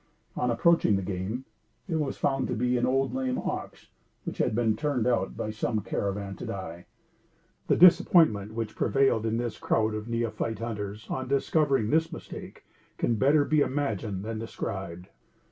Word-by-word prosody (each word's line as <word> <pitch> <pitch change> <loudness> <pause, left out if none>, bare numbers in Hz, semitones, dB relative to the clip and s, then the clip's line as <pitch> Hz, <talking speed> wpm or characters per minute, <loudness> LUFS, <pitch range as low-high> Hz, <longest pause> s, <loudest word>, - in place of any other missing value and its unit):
On 125 - 0
approaching 120 -1 +3
the 95 - -1
game, 100 +7 -4 0.4
it 165 -4 -1
was 145 -3 -2
found 135 -1 0
to - - -2
be 125 +2 +1
an 120 0 +1
old 135 0 +1
lame 130 -1 -1
ox, - - -5 0.3
which - - -6
had - - +1
been 115 -2 +2
turned 140 -2 -1
out 125 -2 0
by 110 - -3
some 110 0 -1
caravan 100 -2 -3
to - - -7
die. 90 -3 -6 0.8
The - - +4
disappointment 160 - +5
which 115 -2 -3
prevailed 135 -5 +2
in 110 +1 0
this 120 -2 -3
crowd 110 -1 +1
of 110 +1 -5
neophyte 115 -1 -2
hunters, 105 -2 -5
on 130 0 -3
discovering 140 -3 +2
this 160 +1 +2
mistake, 160 - -9 0.3
can 120 - +1
be 110 - -2
better 145 +3 +4
imagined 110 -9 -1
than 110 0 -4
described. 95 -5 -5
115 Hz, 165 wpm, -28 LUFS, 105-135 Hz, 0.8 s, disappointment